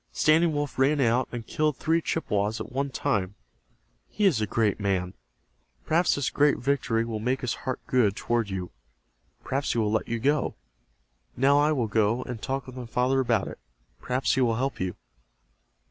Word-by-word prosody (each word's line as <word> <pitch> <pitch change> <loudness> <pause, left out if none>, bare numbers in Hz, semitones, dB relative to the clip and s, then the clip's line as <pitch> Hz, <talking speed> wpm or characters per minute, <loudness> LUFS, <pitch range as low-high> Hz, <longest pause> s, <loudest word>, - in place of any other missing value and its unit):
Standing 160 +2 +3
Wolf 145 -2 -3
ran 140 +3 +3
out 125 0 +2
and 120 -2 -6
killed 155 +1 0
three 165 +1 +1
Chippewas 105 -9 -1
at 110 - -7
one 140 +2 -1
time. 100 -9 -1 0.7
He 210 - 0
is 150 - +3
a 105 - 0
great 105 0 +1
man. 95 -3 -1 0.7
Perhaps 170 +3 +2
this 140 -3 -1
great 145 0 +3
victory 125 -4 0
will 115 -2 -4
make 125 +4 -1
his 125 - -1 0.2
heart 130 - -2
good 110 -6 +2
toward 115 -3 -1
you. 95 -2 -4 0.7
Perhaps 140 +2 -1
he - - -3
will 105 -2 +1
let 110 - 0
you 115 - -1
go. 145 +4 +1 0.8
Now 140 +3 +4
I 150 +1 +3
will 130 -6 +1
go, 110 +3 +1
and 120 -3 -7
talk 135 0 -3
with 130 - -10
my 125 -2 -6
father 125 +3 +1
about 120 -3 +1
it. - - -8 0.4
Perhaps 125 +1 0
he 130 - +1
will 115 -3 +2
help 135 +3 -2
you." 90 -1 -2
125 Hz, 185 wpm, -26 LUFS, 110-140 Hz, 0.8 s, Now